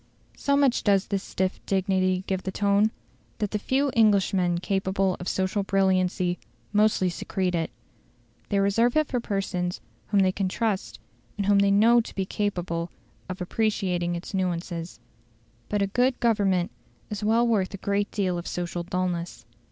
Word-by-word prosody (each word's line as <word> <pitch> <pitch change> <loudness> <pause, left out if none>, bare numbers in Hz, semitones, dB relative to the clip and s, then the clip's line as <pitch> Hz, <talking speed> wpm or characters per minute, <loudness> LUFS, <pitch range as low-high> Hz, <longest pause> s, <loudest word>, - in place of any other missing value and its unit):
So 280 0 +1
much 275 -4 +3
does 200 -2 +3
this 200 -2 -2
stiff 190 0 -2
dignity 185 -1 +1
give 190 -1 -1
the 190 - -4
tone, 200 +2 +3 0.5
that 210 -2 -2
the 210 - -1
few 270 +5 +1
Englishmen 195 -5 +3
capable 190 0 0
of 180 - -6
social 190 +2 0
brilliancy 185 -2 +1 0.3
mostly 210 -3 +3
secrete 180 +1 -2
it. 165 -2 -1 0.8
They 200 - +1
reserve 225 +6 +2
it 310 - +4
for 250 - -1
persons 195 -5 -2 0.3
whom 205 -2 +3
they 190 -1 +3
can 195 0 -1
trust, 210 -1 -2 0.4
and 200 - -1
whom 200 0 +4
they 200 0 +4
know 225 +4 +5
to - - -10
be 190 - -1
capable 175 -4 -2 0.4
of 185 0 -5
appreciating 180 -3 0
its 170 +4 -7
nuances. 175 -2 -3 0.7
But 205 -1 +1
a 195 0 -3
good 250 +1 +2
Government 200 -6 +2 0.4
is 210 0 -4
well 225 +3 +3
worth 205 -5 +1
a - - -6
great 200 +1 -1
deal 185 -4 -1
of 170 - -7
social 175 0 -3
dulness. 175 -7 -3
195 Hz, 160 wpm, -26 LUFS, 180-210 Hz, 0.8 s, know